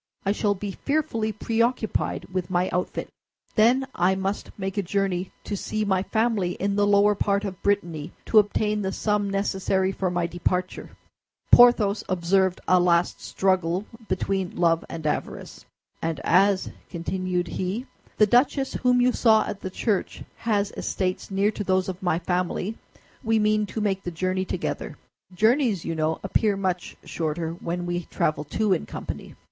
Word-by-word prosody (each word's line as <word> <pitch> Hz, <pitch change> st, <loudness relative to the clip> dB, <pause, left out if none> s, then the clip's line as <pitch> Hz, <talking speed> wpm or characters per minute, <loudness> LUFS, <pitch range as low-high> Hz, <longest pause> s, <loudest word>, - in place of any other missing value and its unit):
I 195 Hz, -, +2 dB
shall 205 Hz, 0 st, +1 dB
be 200 Hz, +1 st, -5 dB
fearfully 230 Hz, -4 st, -1 dB
preoccupied 230 Hz, +1 st, -1 dB
with 185 Hz, -2 st, -2 dB
my 180 Hz, 0 st, +1 dB
outfit. 180 Hz, -, -2 dB, 0.5 s
Then 245 Hz, +4 st, +4 dB
I 180 Hz, +2 st, +2 dB
must 195 Hz, +2 st, -3 dB
make 195 Hz, 0 st, -3 dB
a -, -, +2 dB
journey 190 Hz, -1 st, -1 dB
to 205 Hz, -, -3 dB
see 215 Hz, +2 st, -2 dB
my 190 Hz, -2 st, +2 dB
family, 220 Hz, -4 st, 0 dB
in 200 Hz, +1 st, -1 dB
the 205 Hz, 0 st, +3 dB
lower 205 Hz, +1 st, +5 dB
part 200 Hz, 0 st, 0 dB
of 190 Hz, -2 st, -6 dB
Brittany, 170 Hz, -6 st, -1 dB
to 220 Hz, -, +6 dB
obtain 210 Hz, 0 st, +1 dB
the 190 Hz, -1 st, -1 dB
sum 210 Hz, -1 st, 0 dB
necessary 195 Hz, -1 st, 0 dB
for 190 Hz, -1 st, -1 dB
my 175 Hz, -1 st, 0 dB
departure." 180 Hz, +1 st, -2 dB, 0.6 s
Porthos 230 Hz, -4 st, +6 dB
observed 185 Hz, +1 st, +2 dB
a 185 Hz, 0 st, +5 dB
last 175 Hz, -1 st, +2 dB
struggle 185 Hz, 0 st, 0 dB, 0.2 s
between 190 Hz, 0 st, -1 dB
love 165 Hz, -1 st, +2 dB
and 160 Hz, -2 st, -7 dB
avarice. 150 Hz, -, -4 dB, 0.4 s
"And 165 Hz, -3 st, -2 dB
as," 190 Hz, +2 st, +3 dB, 0.2 s
continued 180 Hz, +1 st, -2 dB
he, 190 Hz, +9 st, -3 dB, 0.3 s
"the 215 Hz, -, +6 dB
duchess 265 Hz, +5 st, +2 dB
whom 250 Hz, -1 st, +4 dB
you 250 Hz, +1 st, +4 dB
saw 220 Hz, -3 st, +4 dB
at 200 Hz, -, -6 dB
the 190 Hz, -, -4 dB
church 200 Hz, +1 st, -2 dB
has 205 Hz, -3 st, 0 dB
estates 185 Hz, -1 st, -2 dB
near 200 Hz, +2 st, +2 dB
to 210 Hz, -, -4 dB
those 185 Hz, -1 st, +1 dB
of 185 Hz, -1 st, -5 dB
my 175 Hz, -3 st, +1 dB
family, 180 Hz, +4 st, -2 dB, 0.5 s
we 225 Hz, -1 st, +2 dB
mean 215 Hz, 0 st, +2 dB
to 220 Hz, -, -5 dB
make 195 Hz, -2 st, 0 dB
the 180 Hz, -, -4 dB
journey 185 Hz, +2 st, -1 dB
together. -, -, -4 dB, 0.4 s
Journeys, 220 Hz, -, +2 dB
you -, -, -2 dB
know, 160 Hz, 0 st, 0 dB
appear 200 Hz, +1 st, +1 dB
much 185 Hz, -2 st, -2 dB
shorter 160 Hz, 0 st, -2 dB
when 175 Hz, +1 st, -4 dB
we 175 Hz, -1 st, -2 dB
travel 155 Hz, -1 st, -1 dB
two 195 Hz, +7 st, +1 dB
in 175 Hz, -, -2 dB
company." -, -, -7 dB
195 Hz, 165 wpm, -25 LUFS, 180-210 Hz, 0.6 s, to